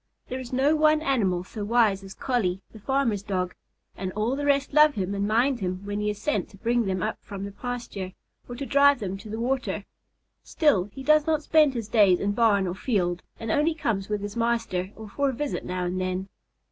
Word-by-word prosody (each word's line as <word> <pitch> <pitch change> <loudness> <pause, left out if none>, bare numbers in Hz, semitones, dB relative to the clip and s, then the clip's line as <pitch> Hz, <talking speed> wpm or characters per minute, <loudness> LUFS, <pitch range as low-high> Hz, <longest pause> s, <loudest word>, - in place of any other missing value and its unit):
There 255 - -3
is 255 -2 -8
no 270 +4 +3
one 310 0 +4
animal 200 - +1
so 210 +3 -7
wise 210 -3 +2
as 190 0 -10
Collie, 195 -8 -1
the 220 - -12
farmer's 235 -3 0
dog, 185 -3 -2 0.4
and 185 -1 -4
all 220 +5 0
the 290 +1 -2
rest 280 0 +2
love 300 0 +6
him 195 0 -2
and 200 0 -1
mind 240 +4 +2
him 185 0 -3
when 205 0 -3
he 210 0 0
is 210 0 -4
sent 300 +8 -1
to 200 - -16
bring 235 +2 +1
them 185 -1 -1
up 215 - -2
from 200 -2 -7
the 200 - -6
pasture 205 -4 -5 0.4
or 245 - -5
to 275 +3 -5
drive 280 0 +5
them 195 -2 -3
to 215 - -10
the 220 +2 -4
water. 260 +2 -1 0.6
Still, 285 - +2
he 210 +7 -10
does 305 +1 +4
not 310 -1 +1
spend 300 -4 +4
his 230 -3 -3
days 205 -5 +4
in 200 - 0
barn 205 -3 +3
or 175 - -2
field 180 -4 -1 0.2
and 225 -1 -3
only 310 +5 +2
comes 210 -10 -2
with 210 -1 -1
his 205 0 -5
master 230 -6 -1
or 220 0 -9
for 280 +7 0
a - - -2
visit 285 +3 -3
now 180 0 -2
and 180 +1 -2
then. 185 +1 -2
220 Hz, 225 wpm, -26 LUFS, 195-265 Hz, 0.6 s, love